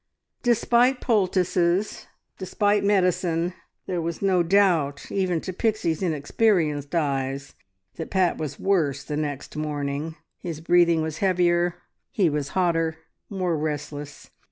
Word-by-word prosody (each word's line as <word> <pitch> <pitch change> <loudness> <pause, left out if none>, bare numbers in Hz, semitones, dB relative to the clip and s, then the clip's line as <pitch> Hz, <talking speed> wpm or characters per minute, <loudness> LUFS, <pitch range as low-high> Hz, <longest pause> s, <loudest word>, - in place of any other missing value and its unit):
Despite 245 +2 +3
poultices, 185 -3 +1 0.3
despite 205 +2 +1
medicine, 180 -3 +1 0.3
there 180 -2 -2
was 165 0 -3
no 190 -3 +2
doubt 170 -6 +2
even 185 -4 0
to 185 - -5
Pixie's 200 -6 0
inexperienced 155 -2 +1
eyes 140 -2 -1 0.4
that 160 - -5
Pat 185 -2 +1
was 155 -3 -5
worse 155 -8 +1
the 150 - -4
next 145 -2 -4
morning. 150 0 -3 0.2
His 165 -4 -5
breathing 170 -1 +3
was 160 -1 -4
heavier, 175 -2 +2 0.3
he 180 -7 +1
was 145 -2 -2
hotter, 165 -3 +1 0.3
more 185 -4 -1
restless. 150 -1 -5
170 Hz, 120 wpm, -24 LUFS, 150-190 Hz, 0.4 s, Despite